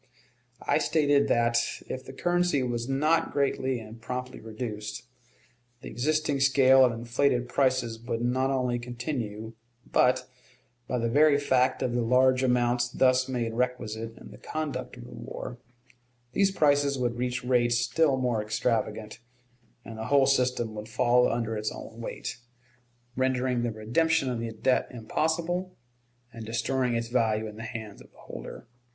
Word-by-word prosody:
I - - +3
stated 145 -3 +3
that, 120 0 +2 0.3
if 130 - -6
the - - -9
currency 175 -1 +1
was 120 0 -2
not 155 +5 +2
greatly 135 -2 0
and 110 +1 -11
promptly 125 +1 -5
reduced, 110 0 -6 0.8
the - - -8
existing 150 +2 0
scale 135 -1 +6
of 125 - +4
inflated 120 +2 0
prices 130 -3 +1
would 115 0 -3
not 130 +2 +1
only 125 -2 0
continue, 120 -3 -5 0.3
but, 125 - +2 0.6
by 125 - -1
the 115 -1 0
very 145 +4 +5
fact 130 -2 +2
of 120 - -1
the 120 - +1
large 130 +2 +4
amounts 120 -1 +2
thus 130 +1 +2
made 120 -3 -2
requisite 115 -2 -3
in - - -12
the - - -13
conduct 150 -5 -4
of - - -10
the - - -12
war, 120 - -7 0.7
these 195 +8 +3
prices 145 -6 +2
would 120 -2 -1
reach 125 0 -2
rates 120 -1 +2
still 135 +3 +2
more 125 -4 0
extravagant, 110 0 -2 0.7
and 110 -1 -8
the 110 - -4
whole 135 +2 +4
system 125 -4 +1
would 105 +1 -7
fall 125 +1 +3
under 115 -1 -2
its 105 0 -2
own 115 +1 -9
weight, - - -5 0.8
rendering 130 -1 +1
the 120 -1 -1
redemption 130 +6 +1
of 120 - -3
the 115 0 -4
debt 125 +4 +1
impossible, 165 +9 -2 0.6
and 115 -1 -8
destroying 120 +2 -1
its 115 0 -2
value 110 -3 +1
in 105 -1 -7
the - - -7
hands 110 -2 -7
of - - -17
the - - -26
holder. - - -9
125 Hz, 155 wpm, -28 LUFS, 115-135 Hz, 0.8 s, scale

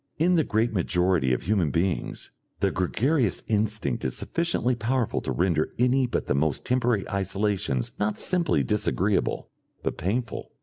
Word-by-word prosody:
In 175 +4 +3
the 165 -3 +4
great 110 -1 0
majority 90 -6 +2
of 65 - 0
human 95 -4 +1
beings, 85 +4 -2 0.3
the - - +2
gregarious 115 - 0
instinct 105 - 0
is 65 - -2
sufficiently 170 -7 0
powerful 120 0 -1
to - - -3
render 85 -3 0
any 125 +2 +3
but - - -2
the - - 0
most 70 +1 0
temporary 120 -5 +1
isolations 100 - -1
not 105 0 -1
simply 180 -2 +1
disagreeable, 105 -2 0 0.3
but - - -3
painful. 115 +7 -3
105 Hz, 145 wpm, -26 LUFS, 90-125 Hz, 0.3 s, the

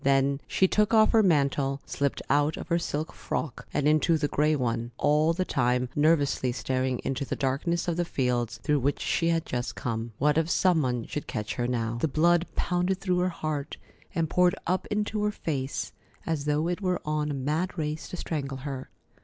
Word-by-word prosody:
Then 140 +1 +2
she 190 - +3
took 210 +3 +2
off 215 0 +6
her 225 - +5
mantle, 140 -6 +2
slipped 140 -1 -2
out 145 +2 +2
of - - -7
her 170 0 +2
silk 155 -1 -3
frock 145 -6 -4
and 145 -1 +1
into 155 +2 +4
the 150 -1 0
gray 150 +2 +2
one, 120 -3 -1
all 150 +2 +3
the 185 +2 -1
time 125 -3 +1
nervously 145 -4 +2
staring 130 0 -1
into 135 +1 -2
the - - -3
darkness 145 +6 -1
of 170 -1 0
the 175 - +2
fields 125 -7 -1
through 150 -2 +2
which 140 +2 0
she 165 - 0
had 165 -1 +1
just 120 -1 -3
come. 115 -1 -3
What 150 +2 +3
if 160 0 -1
some 175 -2 +3
one 125 -4 -1
should 150 - -5
catch 105 -5 -3
her 120 -1 -1
now? 115 -1 -1
The - - +3
blood 170 +4 +3
pounded 180 +1 0
through 180 -2 0
her 180 +1 +2
heart, 155 -4 -4 0.4
and 165 -2 +1
poured 180 +2 +3
up 185 +2 0
into 210 0 -1
her 210 - +2
face, 140 -8 -3 0.3
as 155 -3 -2
though 150 +2 +1
it 175 +3 -2
were 185 -2 0
on 150 0 -1
a 145 - -2
mad 155 +8 -1
race 155 0 -3
to 180 - -6
strangle 140 -5 -3
her. 135 -2 -5
150 Hz, 205 wpm, -27 LUFS, 135-170 Hz, 0.4 s, off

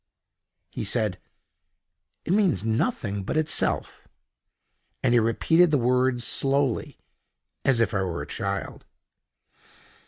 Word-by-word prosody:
He - - -5
said: 105 -4 0 1.1
"It 170 - 0
means 185 - +2
nothing 110 - -1
but 95 - -3
itself"—and 150 -4 -3
he 120 - +5
repeated 160 +10 +3
the 150 - +2
words 125 -1 +1
slowly, 135 -1 0 0.7
as 130 -4 +2
if 110 -5 +1
I 100 - 0
were 90 -3 -3
a - - -10
child. - - -5
125 Hz, 105 wpm, -25 LUFS, 110-145 Hz, 1.1 s, he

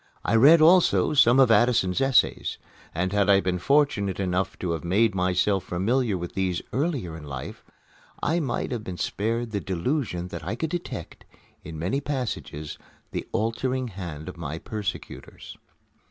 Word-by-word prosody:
I - - 0
read 150 +8 +7
also 170 0 +5
some 130 -2 +5
of 130 -3 +6
Addison's 110 -2 +3
essays; 135 -1 +2 0.3
and 90 +3 -2
had 100 0 +2
I 100 -1 +6
been 90 -2 -1
fortunate 135 -8 +1
enough 95 0 -1
to 90 - -3
have 80 -3 -3
made 100 +5 +2
myself 95 +1 +1
familiar 105 +4 0
with 90 0 -6
these 95 -2 -1
earlier 130 - -2
in 80 - -9
life, 65 -3 -7 0.6
I 165 +3 0
might 140 -7 -2
have 120 -3 -3
been 90 -3 -6
spared 115 +5 -2
the 100 -2 -2
delusion 95 - -2
that - - -7
I 95 +7 -3
could 160 +6 -3
detect, 175 - -6 0.4
in 80 - -8
many 95 - -1
passages, 80 - -4 0.3
the - - -4
altering 125 +3 -1
hand 85 -6 -7
of 90 - -8
my 80 -1 -5
persecutors. 105 +3 -7
100 Hz, 160 wpm, -25 LUFS, 90-130 Hz, 0.6 s, read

